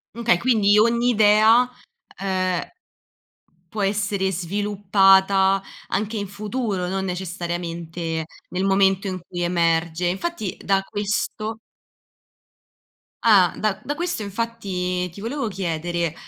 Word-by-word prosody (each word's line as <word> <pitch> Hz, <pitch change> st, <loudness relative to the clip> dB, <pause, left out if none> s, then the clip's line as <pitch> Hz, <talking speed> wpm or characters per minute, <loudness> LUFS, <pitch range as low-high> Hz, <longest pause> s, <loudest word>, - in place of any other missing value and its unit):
M -, -, -8 dB
okay 235 Hz, -6 st, +4 dB
quindi 210 Hz, -4 st, +3 dB
ogni 235 Hz, +3 st, +3 dB
idea, 220 Hz, +2 st, +5 dB, 0.5 s
ehm, 185 Hz, -2 st, 0 dB, 1.1 s
può 210 Hz, +2 st, -4 dB
essere 200 Hz, -1 st, 0 dB
sviluppata 195 Hz, +1 st, +3 dB, 0.3 s
anche 215 Hz, +2 st, -2 dB
in 200 Hz, -, -3 dB
futuro, 205 Hz, -1 st, -3 dB
non 190 Hz, +1 st, -2 dB
necessariamente 170 Hz, -2 st, -4 dB, 0.2 s
nel 185 Hz, +1 st, -2 dB
momento 195 Hz, 0 st, +2 dB
in 185 Hz, -1 st, -3 dB
cui 175 Hz, -1 st, -5 dB
emerge; 170 Hz, 0 st, +1 dB
infatti, 200 Hz, -, -2 dB
da 195 Hz, 0 st, +2 dB
questo 210 Hz, +2 st, -3 dB, 1.7 s
Ah, 195 Hz, -6 st, +6 dB
da 210 Hz, -3 st, -1 dB
da 290 Hz, -, -4 dB
questo 345 Hz, -5 st, -2 dB
infatti 195 Hz, -4 st, -3 dB
ti 190 Hz, +4 st, -12 dB
volevo 235 Hz, +2 st, -3 dB
chiedere: 175 Hz, -3 st, -2 dB
195 Hz, 110 wpm, -22 LUFS, 180-215 Hz, 1.7 s, Ah